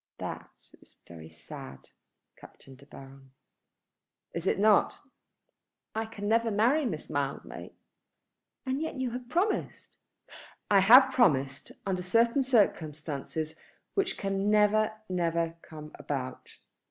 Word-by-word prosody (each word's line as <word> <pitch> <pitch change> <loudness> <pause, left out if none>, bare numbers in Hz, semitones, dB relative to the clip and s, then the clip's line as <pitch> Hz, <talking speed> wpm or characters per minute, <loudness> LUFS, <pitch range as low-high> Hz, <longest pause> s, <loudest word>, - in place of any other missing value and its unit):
"That - - -6 0.3
is - - -21
very 80 -2 -11
sad, 70 -4 -11 0.4
Captain 135 - -15
De 140 +2 -19
Baron." 135 -1 -14 1.0
"Is 170 +2 -4
it - - +2
not? 210 +1 +3 1.0
I 220 0 -2
can 205 -2 -6
never 230 +1 +2
marry 240 +9 +2
Miss - - -5
Mildmay." - - -4 0.9
"And 265 +2 -2
yet 320 - -3
you 260 -2 -2
have 245 0 -7
promised?" 370 +8 -2 0.7
"I 200 - +7
have 250 +7 +8
promised 140 - +1
under 185 -2 -1
certain 230 +8 +2
circumstances 155 - 0 0.4
which 390 -2 -1
can 195 +1 -1
never, 215 +1 +3 0.2
never 170 -2 -1
come 155 -2 -11
about." 130 -3 -6
195 Hz, 115 wpm, -29 LUFS, 150-235 Hz, 1.0 s, have